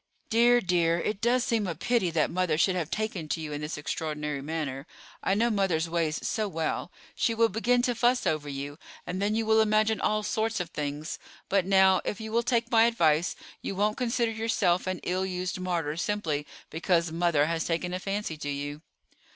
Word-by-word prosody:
Dear, 240 +2 +5
dear, 170 -2 +2
it 200 +3 -2
does 240 +2 +3
seem 225 -5 0
a 170 - -3
pity 225 +2 +1
that 165 -2 +1
mother 175 -3 +1
should 185 +3 +3
have 165 -4 -2
taken 215 -7 -3
to 165 - -1
you 155 -2 -5
in 145 - -4
this 150 0 -4
extraordinary 150 -1 -3
manner. 145 -1 -4 0.3
I 195 - +1
know 230 +3 +2
mother's 185 -6 +1
ways 165 -2 -1
so 215 -2 0
well. 165 -4 -2 0.2
She 230 - 0
will 230 0 +4
begin 245 +2 +2
to 245 - +1
fuss 240 +2 +2
over 150 -2 0
you, 140 +2 -6 0.3
and 185 +2 -3
then 210 +2 +1
you 225 0 0
will 220 0 +5
imagine 215 0 +2
all 215 0 +1
sorts 220 +1 -1
of 175 -2 -4
things; 150 +2 -4 0.3
but 190 -2 +2
now, 190 -1 +5
if 210 - -3
you 220 0 -6
will 230 +1 +3
take 235 0 0
my 225 -1 +6
advice, 170 -7 +2 0.3
you 195 - -4
won't 210 +2 +1
consider 240 -2 0
yourself 220 -6 +1
an 185 -1 -2
ill 185 +1 0
used 185 -1 -3
martyr 170 -5 -1
simply 165 -7 -1 0.2
because 170 0 +1
mother 165 -3 +2
has 165 0 -1
taken 175 +1 -1
a 185 - -2
fancy 195 -4 -3
to 145 - -5
you." 145 +1 -4
185 Hz, 200 wpm, -28 LUFS, 160-220 Hz, 0.3 s, my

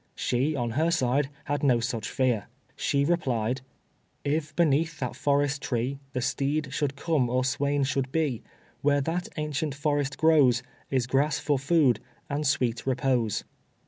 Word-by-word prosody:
She, 135 +5 0
on 120 -3 -1
her 155 +8 +1
side, 140 -3 +1 0.2
had 145 0 -1
no 125 -5 +4
such 115 -1 -3
fear. 125 -6 0 0.3
She 140 0 +1
replied 130 -7 0 0.6
"If 150 +1 -1
beneath 165 0 +2
that 125 -3 -3
forest 145 0 +1
tree, 125 +3 -2
The 125 - -1
steed 140 +2 -1
should 140 -1 -1
come 145 -4 +1
or 130 +1 +1
swain 140 +1 +1
should 135 -1 -1
be, 145 -7 0 0.4
Where 145 0 +3
that 165 +5 -2
ancient 150 -1 -2
forest 145 -1 0
grows, 145 -7 +4 0.3
Is 130 -3 +1
grass 140 +3 +1
for 145 -3 0
food, 140 -3 +3 0.3
and 145 +1 0
sweet 125 -4 0
repose." 130 -5 +1
140 Hz, 150 wpm, -27 LUFS, 125-150 Hz, 0.6 s, no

